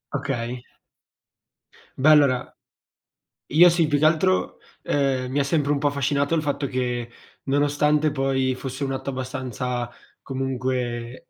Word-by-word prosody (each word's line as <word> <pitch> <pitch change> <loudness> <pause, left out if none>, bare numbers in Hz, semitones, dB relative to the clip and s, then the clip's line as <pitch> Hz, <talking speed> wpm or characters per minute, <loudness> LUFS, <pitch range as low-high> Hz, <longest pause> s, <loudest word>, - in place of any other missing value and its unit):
Okay. 125 -3 -3 1.3
Beh, 140 +4 +4
allora 140 -5 +4 0.9
io 175 +5 +7
sì, 165 -2 +2
più 145 -1 +1
che 155 - +3
altro, 155 - +2 0.3
ehm, 130 -3 0
mi 145 - 0
ha - - +3
sempre 145 0 0
un 145 - +2
po' 145 - +1
affascinato, 140 +2 0
il 155 - +1
fatto 145 -1 -2
che 125 -2 -2 0.3
nonostante 145 +2 +2
poi 135 -2 0
fosse 135 +1 -5
un 135 - -2
atto 135 +1 -4
abbastanza 125 -2 -4 0.3
comunque 130 -2 -3
135 Hz, 135 wpm, -23 LUFS, 125-145 Hz, 1.3 s, io